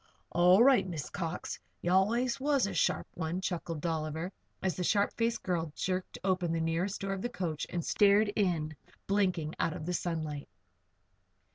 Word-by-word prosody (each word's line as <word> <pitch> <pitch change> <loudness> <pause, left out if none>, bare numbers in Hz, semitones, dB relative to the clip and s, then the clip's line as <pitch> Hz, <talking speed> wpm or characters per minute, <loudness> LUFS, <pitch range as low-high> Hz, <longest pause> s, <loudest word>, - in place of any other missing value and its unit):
"All 180 +5 +6
right, 260 -6 +5
Miss 160 -5 -5
Cox. 175 -3 -4 0.2
Ye 175 - -1
allus 235 +7 +2
was 280 -3 +2
a 200 - -3
sharp - - +1
one," 170 0 -2
chuckled 170 -4 -3
Dolliver, 160 +2 -2 0.3
as 190 -2 +1
the 180 - -2
sharp 200 +3 +2
faced 230 0 0
girl 170 -4 -1
jerked 185 0 -2
open 185 -3 +1
the 165 - 0
nearest 165 +4 -1
door 195 0 -1
of 195 - -4
the 240 - -2
coach 170 -9 -3
and 175 -2 -3
stared 205 +1 +4
in, 165 -6 0 0.3
blinking, 185 -6 +1
out 165 - +1
of 155 - -6
the 180 - -2
sunlight. 155 -5 -3
180 Hz, 170 wpm, -31 LUFS, 165-200 Hz, 0.3 s, All